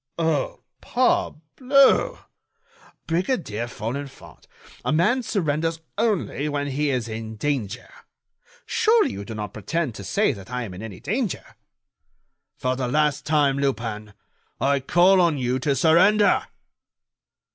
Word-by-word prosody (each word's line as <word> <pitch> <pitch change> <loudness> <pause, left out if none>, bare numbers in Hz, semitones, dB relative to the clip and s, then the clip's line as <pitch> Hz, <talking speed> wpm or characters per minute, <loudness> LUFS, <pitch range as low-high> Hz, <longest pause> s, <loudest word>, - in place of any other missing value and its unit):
"Oh! 160 -4 -1 0.2
parbleu! 265 - +2 0.9
Brigadier 165 - -1
Folenfant, 125 +5 -7 0.4
a - - 0
man 180 +12 +2
surrenders 165 -6 -1 0.2
only 200 -9 0
when 145 -1 -2
he 145 +2 0
is 125 -4 -1
in 110 0 -6
danger. 120 -4 -3 0.8
Surely, 460 -1 +3
you 100 - -6
do 110 +2 -7
not 105 -1 -5
pretend 145 +5 -2
to 100 - -9
say 200 - +1
that 100 -2 -11
I 125 -1 -3
am 100 -5 -7
in 90 - -9
any 110 -5 -8
danger." 215 - -2 1.1
"For 130 0 -1
the 130 -1 -2
last 150 +4 +1
time, 145 -3 +2
Lupin, 115 -6 -3 0.4
I 140 +1 +2
call 180 +7 +4
on 170 -4 +2
you 125 0 -1
to 140 +1 0
surrender." 190 - +4
145 Hz, 125 wpm, -23 LUFS, 120-175 Hz, 1.1 s, call